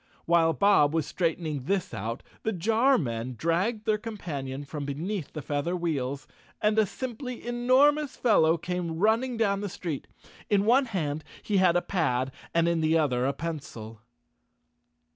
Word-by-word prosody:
While 165 -1 +4
Bob 165 -7 +4
was 160 - +1
straightening 160 -5 -2
this 190 -3 -1
out, 115 +3 -4 0.2
the 220 - -1
jar 225 +8 +3
men 120 -3 -3
dragged 190 - 0
their 215 -2 +2
companion 145 - -5
from 145 +1 -5
beneath 160 +5 -4
the 150 - -6
feather 145 +6 -1
wheels, 140 -6 -2 0.3
and 210 +1 +2
a 215 - +3
simply 250 +2 -6
enormous 260 +5 +3
fellow 170 -9 +4
came 175 -2 -3
running 225 +6 +2
down 200 -3 +1
the 205 - -3
street. 175 -7 -5 0.4
In 205 -1 +3
one 255 +5 +5
hand 155 - -3 0.2
he 205 - 0
had 185 -2 +4
a 175 - +2
pad 135 -8 0 0.2
and 170 0 +2
in 170 -1 +1
the 160 +1 +3
other 130 -5 +1
a 140 - 0
pencil. 135 -9 -6
170 Hz, 160 wpm, -27 LUFS, 145-215 Hz, 0.4 s, one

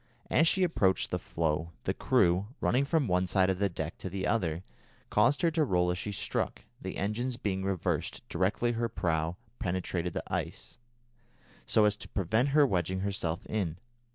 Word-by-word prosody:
As 160 - +5
she 190 +3 +3
approached 100 - +2
the - - 0
floe, 80 0 -1
the - - 0
crew, 90 +4 +2
running 130 +3 +2
from 150 -2 +1
one 90 0 +2
side 95 0 +3
of 95 - -3
the 100 -1 +2
deck 85 -1 -5
to 95 - -4
the 95 +1 -3
other, 90 -6 0 0.5
caused 145 +6 +3
her 170 - +4
to 160 -1 +2
roll 90 -8 +2
as 90 - -2
she 105 - -3
struck, 100 - -2 0.2
the - - -5
engines 115 +5 -1
being 95 -4 -2
reversed 95 -3 -2
directly 95 +7 +1
her 115 0 -1
prow 85 -4 -1 0.2
penetrated 90 -1 -2
the - - -3
ice, - - -4 0.9
so 110 - +4
as 105 0 +3
to - - -9
prevent 110 +8 +1
her 145 +1 +5
wedging 95 - 0
herself 95 -4 -2
in. 90 -7 -2
95 Hz, 180 wpm, -30 LUFS, 90-115 Hz, 0.9 s, As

